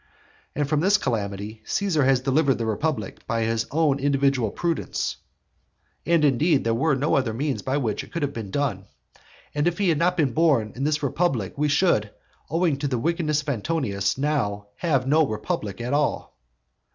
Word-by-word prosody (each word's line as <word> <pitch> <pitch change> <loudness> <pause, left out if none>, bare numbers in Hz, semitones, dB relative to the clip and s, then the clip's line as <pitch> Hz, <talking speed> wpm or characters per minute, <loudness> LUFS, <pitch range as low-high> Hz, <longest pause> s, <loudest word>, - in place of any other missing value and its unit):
And 145 -1 0
from 150 0 +1
this 195 +6 +4
calamity 105 - -3
Caesar 180 - 0
has 130 -1 +3
delivered 135 +1 +2
the 115 - -2
republic 125 +8 -3
by 115 -2 0
his 115 0 -1
own 150 -2 +2
individual 140 -4 +2
prudence, 170 +8 -2 0.9
(and, 165 -2 +4
indeed, 145 +2 +3
there 115 - +1
were 135 +5 +2
no 140 +4 0
other 125 -5 0
means 135 -4 -2
by 130 +5 -1
which 115 -7 -1
it - - -15
could 170 - -3
have 140 0 -1
been 110 -4 -6
done.) 100 -5 -2 0.7
And 145 +2 +1
if 175 - 0
he 200 -3 +2
had 155 -3 +2
not 180 +2 +2
been 140 -7 +1
born 135 -9 +2
in 135 +3 -2
this 150 0 0
republic 135 - 0
we 150 +1 +1
should, 145 - +2 0.4
owing 165 -2 +1
to 145 +1 -2
the 130 -3 -1
wickedness 155 +2 0
of 150 - -5
Antonius, 115 - -1
now 105 -9 -1
have 135 -7 +1
no 155 +4 +4
republic 105 -2 -3
at 120 +3 -3
all. 145 0 0
140 Hz, 185 wpm, -24 LUFS, 115-155 Hz, 0.9 s, this